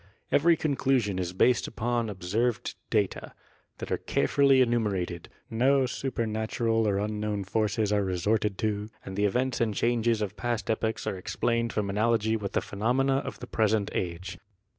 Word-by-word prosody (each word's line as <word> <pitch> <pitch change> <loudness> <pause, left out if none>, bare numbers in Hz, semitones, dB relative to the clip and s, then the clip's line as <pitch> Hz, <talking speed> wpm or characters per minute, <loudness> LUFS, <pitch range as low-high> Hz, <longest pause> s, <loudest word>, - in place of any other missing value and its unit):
Every 165 +3 +4
conclusion 130 -10 +1
is 90 -1 -2
based 120 +6 +3
upon 115 0 -1
observed 105 +4 -1 0.2
data 105 -3 -1 0.4
that - - -7
are - - 0
carefully 140 -2 +3
enumerated, 105 -8 0 0.2
no 130 +4 +3
supernatural 115 -2 -1
or 100 -1 +1
unknown 105 0 -2
forces 105 +1 0
are 105 -1 +2
resorted 100 +2 0
to 105 -1 -2 0.2
and 95 - -6
the 105 +1 +1
events 125 +5 0
and 110 -3 +1
changes 115 -1 +1
of 105 0 -4
past 115 +3 -2
epochs 110 0 -1
are 95 - -3
explained 115 +5 -1
from 105 -2 -1
analogy 110 +2 +1
with 100 -3 -4
the - - +1
phenomena 125 +6 +1
of 135 - -5
the - - -5
present 110 -3 +1
age. 90 +1 -4
110 Hz, 155 wpm, -28 LUFS, 100-120 Hz, 0.4 s, Every